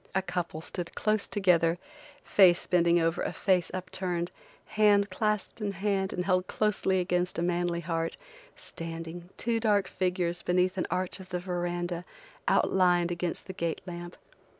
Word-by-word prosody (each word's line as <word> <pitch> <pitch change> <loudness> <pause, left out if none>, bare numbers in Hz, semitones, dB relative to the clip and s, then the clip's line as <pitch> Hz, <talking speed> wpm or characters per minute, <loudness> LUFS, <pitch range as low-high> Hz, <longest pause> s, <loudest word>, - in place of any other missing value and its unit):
A 190 - +2
couple 175 -3 -3
stood 170 +1 -6
close 215 -1 +1
together, 175 -4 +3 0.5
face 180 -3 +5
bending 170 -1 +4
over 165 0 +1
a - - -1
face 185 -4 +1
up 185 0 -5
turned, 175 -2 -2 0.4
hand 205 -2 +4
clasped 210 +2 -1
in 205 -1 -1
hand 195 0 0
and 180 - -2
held 185 -1 +2
closely 200 -3 +1
against 180 0 0
a 170 - 0
manly 175 -1 0
heart, 165 0 -2 0.4
standing, 165 +1 -7
two 230 -1 0
dark 205 -4 +2
figures, 180 -2 -1
beneath 180 +1 +2
an - - -1
arch 185 +1 -1
of 185 -1 -11
the 180 -1 -2
verandah, 175 -1 -2 0.4
outlined 175 -2 +3
against 175 0 -2
the 190 - -7
gate 170 -3 -2
lamp. 175 -1 -7
180 Hz, 155 wpm, -29 LUFS, 175-190 Hz, 0.5 s, face